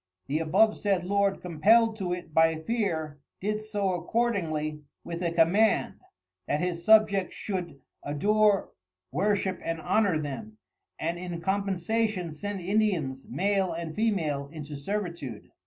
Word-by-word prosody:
The 145 +3 -1
abovesaid 195 +3 +2
Lord 200 +1 +1
compelled 215 +7 +4
to 185 -4 -3
it 175 -3 -5
by 160 0 +4
fear 160 -9 -2 0.2
did 210 +2 -1
so 205 -3 -1
accordingly 170 -6 -1 0.2
with 170 0 -5
a 175 - +1
command, 175 +6 +3 0.5
that 145 - 0
his 175 -1 -2
Subjects 210 -2 +4
should 180 -8 -4 0.2
adore 205 +7 +2 0.4
Worship 190 +4 0
and 165 0 -2
Honour 190 0 +2
them, 155 +10 -6 0.4
and 170 +2 -2
in 175 -2 -5
compensation 195 0 -1
send 200 +5 -5
Indians 175 -9 0
Male 195 -2 +1
and 165 -1 -5
Female 160 -11 0
into 150 -2 -7
servitude. 170 - -5
180 Hz, 125 wpm, -28 LUFS, 160-205 Hz, 0.5 s, compelled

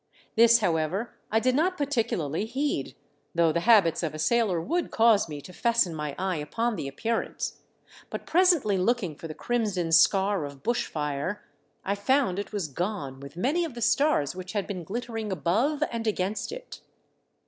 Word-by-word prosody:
This 235 +1 +6
however 175 +4 0 0.2
I 220 - +4
did 255 +2 +2
not 360 +7 +1
particu 275 -6 0
larly 160 +6 -2
heed, 275 +5 -2 0.4
though 170 -1 +4
the 170 - 0
habits 170 -8 +5
of 160 -3 -3
a - - -5
sailor 200 +2 +2
would 335 - -1
cause 225 -5 +4
me 145 -1 -6
to 180 - -12
fasten 235 -4 +2
my 150 -2 -4
eye 185 -2 -1
upon 225 +10 -1
the 140 - -4
appearance; 225 +12 -3 0.5
but - - -6
presently 330 - +3
looking 190 -5 0
for 165 - -8
the 155 - -7
crimson 205 -6 -1
scar 190 +2 +4
of 140 -1 -8
bush 240 +1 0
fire, 150 +6 -3 0.4
I 200 - +1
found 205 -1 +1
it 205 - -5
was 200 -6 -2
gone 145 -3 -4
with 140 +3 -11
many 285 - +1
of 315 -7 -5
the - - -6
stars 235 - +2
which 185 +1 -7
had 205 -2 -1
been 185 -4 -5
glit 230 +9 -4
tering 225 -3 -4
above 225 - +1
and 230 -1 -3
against 200 - -1
it. - - -9
205 Hz, 180 wpm, -27 LUFS, 165-235 Hz, 0.5 s, This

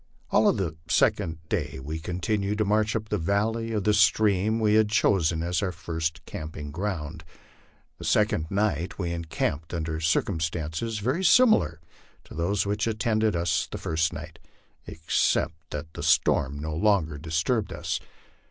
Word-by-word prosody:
All - - +5
of - - +1
the 85 -5 -2
second 80 -1 +1
day 75 -9 -2
we 75 +5 -5
continued 100 +5 -2
to 110 - +1
march 105 +2 +1
up 110 -1 -3
the 105 - 0
valley 110 +6 0
of 105 -3 -1
the 105 - +3
stream 105 +1 +3
we 105 -1 +3
had 110 -1 +4
chosen 85 -6 +2
as 90 +1 0
our 95 -3 -1
first 80 -1 -4
camping 75 -2 -7
ground. 80 -3 -4 0.8
The - - -7
second 80 +1 +2
night 95 -4 -1
we 90 -3 -2
encamped 80 -1 -3
under 80 -1 -3
circumstances 80 +4 -1
very 130 - -1
similar 170 - +5 0.4
to - - -13
those 90 +5 0
which 105 +2 -1
attended 110 -2 +1
us 85 -1 0
the - - -4
first 80 -1 0
night, - - -9 0.5
except 80 0 +1 0.2
that 75 +2 -6
the - - -7
storm 70 +2 +2
no 75 +1 -4
longer 80 -5 +1
disturbed 85 - -1
us. - - -3
90 Hz, 155 wpm, -26 LUFS, 80-105 Hz, 0.8 s, All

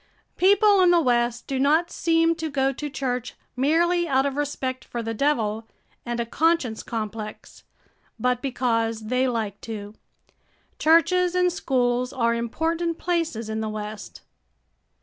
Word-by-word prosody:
People 405 +1 +5
in 360 - +5
the 350 -1 +5
West 240 -4 +1
do 270 -1 -3
not 310 +5 +2
seem 330 0 +2
to 320 -1 -3
go 270 -1 +1
to 295 +3 -5
church 250 -3 -3 0.2
merely 340 +6 +2
out 270 -2 +2
of 280 -1 -1
respect 265 -3 -3
for 235 -1 -5
the 225 0 -3
devil 225 -4 0 0.4
and 240 0 -2
a 235 - 0
conscience 290 -4 +1
complex, 215 -1 -6 0.5
but 250 +1 0
because 230 -4 -1
they 255 +1 +2
like 220 -5 -3
to. 210 -2 -7 0.9
Churches 355 +3 +3
and 360 -1 +2
schools 250 -5 0
are 235 -3 +1
important 325 +8 -1
places 330 -11 -2
in 220 0 -3
the 220 - -2
West. 215 0 -7
260 Hz, 145 wpm, -24 LUFS, 230-330 Hz, 0.9 s, People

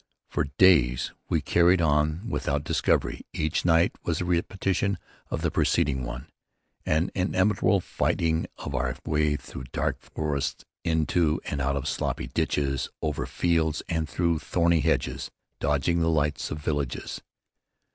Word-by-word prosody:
For 75 - +1
days 70 -10 +5 0.2
we - - +2
carried 85 +1 +4
on 75 +1 +2
thus 115 - -5
without 70 +1 -1
discovery. - - +1
Each 80 +1 0
night 85 -1 +4
was - - -1
a 90 - -1
repetition 95 +3 0 0.3
of - - -3
the - - +1
preceding 65 -3 +1
one, - - -5 0.6
an 80 +3 +2
interminable 95 +1 +2
fighting 80 -1 0
of 70 - -6
our - - -1
way 75 -1 +2
through 65 -2 -8
dark - - -1
forests, 75 -3 -3 0.2
into 80 0 +2
and 70 - -2
out 70 +1 +1
of 70 0 -2
sloppy - - -2
ditches, 70 -2 -1
over 75 -3 -1
fields 80 -2 +1
and 80 -2 -1
through 85 -2 +1
thorny 85 +2 +2
hedges, - - 0 0.3
dodging 75 +4 +1
the 80 0 +2
lights 75 -2 0
of 75 - -4
villages. 75 -4 -3
80 Hz, 145 wpm, -27 LUFS, 70-85 Hz, 0.6 s, days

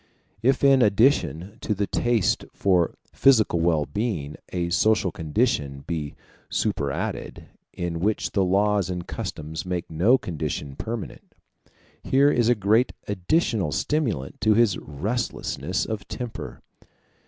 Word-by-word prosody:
If 130 +3 +2
in 135 -1 +6
addition 100 - +2
to 105 - -1
the 100 +1 0
taste 120 -1 +1
for 90 -4 +2 0.2
physical 110 -10 +4
well 80 -3 +2
being 95 -10 -3 0.2
a 85 -1 -2
social 105 0 +2
condition 75 - -1
be 75 -4 -4 0.3
superadded, 85 +9 -2 0.2
in 85 -1 -4
which 105 +5 0
the 100 - +2
laws 100 +1 +2
and 90 -1 -4
customs 80 +1 -5
make 90 -2 -4
no 100 +11 +4
condition 75 - -4
permanent, 115 +5 -6 0.7
here 140 +2 +4
is 120 -3 +2
a 120 - +5
great 110 +4 +2
additional 100 - 0
stimulant 110 - -1
to 110 0 +4
this 115 -4 +4
restlessness 90 - -3
of 110 -3 -5
temper. 120 -2 -6
100 Hz, 125 wpm, -25 LUFS, 85-115 Hz, 0.7 s, in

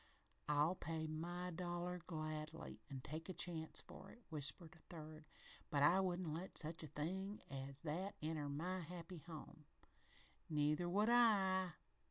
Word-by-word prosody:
"I'll 150 +3 +5
pay 160 -3 -2
my 175 +3 -2
dollar 175 +1 -2
gladly, 155 -1 -4
and 135 -3 -5
take 160 +3 -5
a - - -1
chance 165 -3 +1
for - - -10
it," - - -12
whispered 155 +1 +1
a 160 - -16
third, 155 -2 -7 0.4
"but 145 -1 +4
I 175 +6 +7
wouldn't 180 -4 +1
let 175 +4 -4
such 160 +1 +2
a 155 - -5
thing 190 +8 -2
as 135 +1 -2
that 175 +6 -2
enter 155 -2 -1
my 175 +6 -1
happy 170 +1 -6
home 155 -1 -9 0.4
" - - -21 0.3
"Neither 150 +3 +2
would 205 +5 +4
I!" 190 -6 +5
165 Hz, 155 wpm, -43 LUFS, 155-180 Hz, 0.4 s, I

